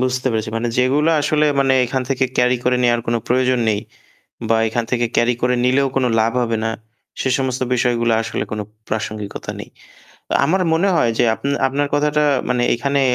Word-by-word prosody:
বুঝতে 130 0 0
পেরেছি। 110 -1 -2
মানে 120 +1 -1
যেগুলা 145 +6 +2
আসলে 150 0 +2
মানে 135 -1 +2
এখান 130 +2 -2
থেকে 135 0 +1
ক্যারি 125 0 +3
করে 125 0 +2
নেওয়ার 120 -1 +2
কোনো 115 0 +1
প্রয়োজন 130 0 +2
নেই 105 -1 +1 0.7
বা 115 - +3
এখান 115 +1 -2
থেকে 120 -1 +1
ক্যারি 120 +1 +3
করে 125 0 +2
নিলেও 135 +2 +3
কোন 135 - +2 0.2
লাভ 115 +1 +1
হবে 115 -1 -1
না, 115 - 0 0.5
সে - - 0
সমস্ত 130 -1 -2
বিষয়গুলো 120 -1 +1
আসলে 110 -1 -3
কোন 105 - -3 0.3
প্রাসঙ্গিকতা 105 -1 -4
নেই। - - -9 0.6
আ - - +2
আমার 185 +5 +1
মনে 180 +5 +2
হয় 120 -7 +2
যে, - - +4
আ - - -11 0.3
আপনার 140 +2 -1
কথাটা 150 +1 +1 0.3
মানে 125 -1 +1
এখানে 140 +4 0
125 Hz, 185 wpm, -19 LUFS, 115-135 Hz, 0.7 s, যে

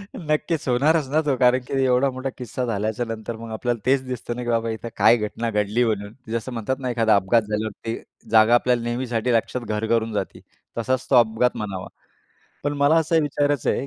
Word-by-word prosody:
नक्कीच 155 -1 -1
होणारच 145 +4 +2
ना 155 +2 +2
तो, 140 -2 +2
कारण 125 +1 +4
की - - -6
एवढा 130 +1 +3
मोठा 130 +1 -4
किस्सा 125 0 -4
झाल्याच्यानंतर 115 +1 -3
मग 115 0 -9
आपल्याला 120 +1 -2
तेच 130 0 +3
दिसतं 120 -1 -4
ना 125 - -5
की 120 - -4
बाबा 115 -1 +1
इथं 115 +1 -5
काय 120 - +6
घटना 110 +2 -3
घडली 105 +3 +1
म्हणून. 105 -2 -2 0.2
जसं 115 +2 -3
म्हणतात 115 +3 -2
ना, 130 - -3
एखादा 115 -3 +3
अपघात 100 +4 +3
झाल्यावर 105 0 -3
ते 115 0 -3 0.3
जागा 110 +1 +6
आपल्याला 120 0 +2
नेहमीसाठी 120 0 -1
लक्षात 115 +2 0
घर 105 +1 -1
करून 115 -1 +1
जाती. 105 - -4 0.4
तसाच 130 +2 -1
तो 135 - +4
अपघात 120 +1 +3
म्हणावा. 95 -3 -5 0.8
पण 145 - 0
मला 145 +3 +4
असं 160 0 +3
विचारायचं 145 -2 0
आहे, 135 - -2
120 Hz, 195 wpm, -23 LUFS, 110-130 Hz, 0.8 s, काय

